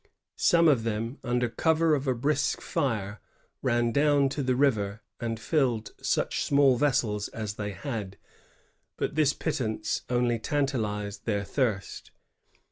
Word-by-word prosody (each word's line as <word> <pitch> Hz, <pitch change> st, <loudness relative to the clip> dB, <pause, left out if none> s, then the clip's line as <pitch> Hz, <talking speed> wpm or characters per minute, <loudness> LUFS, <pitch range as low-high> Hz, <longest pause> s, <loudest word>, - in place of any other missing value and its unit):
Some 170 Hz, -1 st, +5 dB
of 140 Hz, -7 st, +4 dB
them^ 115 Hz, +3 st, -3 dB
under 125 Hz, 0 st, +1 dB
cover 160 Hz, +6 st, +2 dB
of 140 Hz, -1 st, 0 dB
a 130 Hz, -, +2 dB
brisk 145 Hz, +4 st, 0 dB
fire, 110 Hz, -, -2 dB, 0.4 s
ran 120 Hz, 0 st, +1 dB
down 145 Hz, 0 st, +3 dB
to 145 Hz, -, -3 dB
the 130 Hz, -1 st, +1 dB
river 110 Hz, -6 st, +1 dB, 0.2 s
and 115 Hz, -1 st, -3 dB
filled 120 Hz, -7 st, 0 dB
such -, -, 0 dB
small 140 Hz, -2 st, +4 dB
vessels 120 Hz, -6 st, +1 dB
as 110 Hz, -2 st, -5 dB
they 105 Hz, -1 st, -4 dB
had; 105 Hz, -6 st, -5 dB, 0.8 s
but -, -, -2 dB
this 150 Hz, -2 st, +3 dB
pittance 115 Hz, -9 st, -2 dB
only 120 Hz, -1 st, +1 dB
tantalized 110 Hz, -7 st, -2 dB
their 100 Hz, -3 st, 0 dB
thirst. 110 Hz, -3 st, -2 dB
120 Hz, 135 wpm, -28 LUFS, 110-140 Hz, 0.8 s, Some